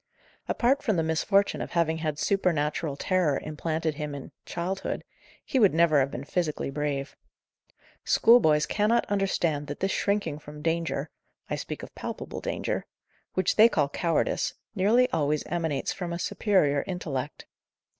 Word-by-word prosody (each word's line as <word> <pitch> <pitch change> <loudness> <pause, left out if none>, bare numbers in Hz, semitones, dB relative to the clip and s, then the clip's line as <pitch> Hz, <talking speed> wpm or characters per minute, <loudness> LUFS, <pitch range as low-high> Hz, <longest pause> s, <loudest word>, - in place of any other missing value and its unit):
Apart 265 +4 +2
from 215 -7 +1
the 165 - +1
misfortune 195 +5 +1
of - - -6
having 160 -1 +1
had 155 -2 -2
supernatural 155 -6 0
terror 175 -7 +1
implanted 160 +1 -2
in 145 - -13
him 150 -1 -3
in 140 - -8 0.2
childhood, 180 +3 -3 0.4
he 265 - +1
would 200 -8 +5
never 165 -3 +5
have 135 0 +2
been 130 -1 -6
physically 150 -2 -2
brave. 140 -1 -3 0.9
Schoolboys 160 -11 +5
cannot 215 +3 +2
understand 170 -7 0
that 145 - -6
this 195 0 0
shrinking 200 -8 0
from 150 0 -11
danger 165 -3 -1 0.4
(I - - +1
speak - - -6
of - - -9
palpable - - -6
danger), - - -3 0.5
which 185 -1 +1
they 220 +2 +8
call 145 -9 +1
cowardice, 165 +2 0 0.2
nearly 220 +5 +4
always 150 -1 +1
emanates 160 -5 -2
from 175 -3 -4
a - - -2
superior 170 -7 +1
intellect. 150 -7 -4
165 Hz, 150 wpm, -27 LUFS, 150-190 Hz, 0.9 s, they